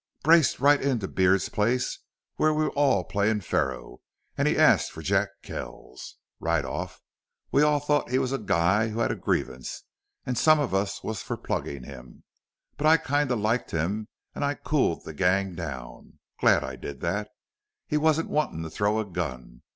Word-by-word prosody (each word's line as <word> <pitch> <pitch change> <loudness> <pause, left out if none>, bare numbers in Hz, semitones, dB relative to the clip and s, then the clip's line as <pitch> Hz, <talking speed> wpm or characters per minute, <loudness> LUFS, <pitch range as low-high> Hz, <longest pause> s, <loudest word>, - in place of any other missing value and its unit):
Braced 160 -1 +5
right 145 +2 +5
into 125 -8 0
Beard's 95 +1 +2
place, 120 +4 0 0.4
where 155 - +3
we 155 0 +1
was 155 - -1
all 135 -10 +3
playin' 105 +4 0
faro, 75 -7 -2 0.3
an' - - +1
he - - +1
asks - - +5
for 80 - -10
Jack 95 +3 +1
Kells. 65 - -8 0.2
Right 80 -3 0
off 65 - -6 0.5
we 140 - +4
all 150 -1 +4
thought 145 -1 0
he 130 - +1
was 130 -1 0
a 135 - -1
guy 100 +2 +2
who 110 +1 -3
had - - +1
a - - -2
grievance, 65 -1 -3 0.4
an' 125 - -1
some 155 +3 +5
of 145 - -1
us 95 +1 -1
was 110 -3 -4
for - - -4
pluggin' 70 -3 -4
him. - - -12 0.5
But 150 - +1
I 160 +1 +7
kinda 145 -4 0
liked 110 +3 0
him 100 +7 -2 0.3
an' - - -6
I 145 0 0
cooled 140 - 0
the 80 - -7
gang 95 +4 +1
down. 70 -8 -8 0.2
Glad - - +4
I - - -6
did 70 -3 -8
that. - - -2 0.6
He 150 - 0
wasn't 160 +1 +1
wantin' 150 - -1
to 80 - -7
throw 105 +1 0
a 110 - -2
gun. 65 -10 -5
105 Hz, 180 wpm, -26 LUFS, -, 0.6 s, I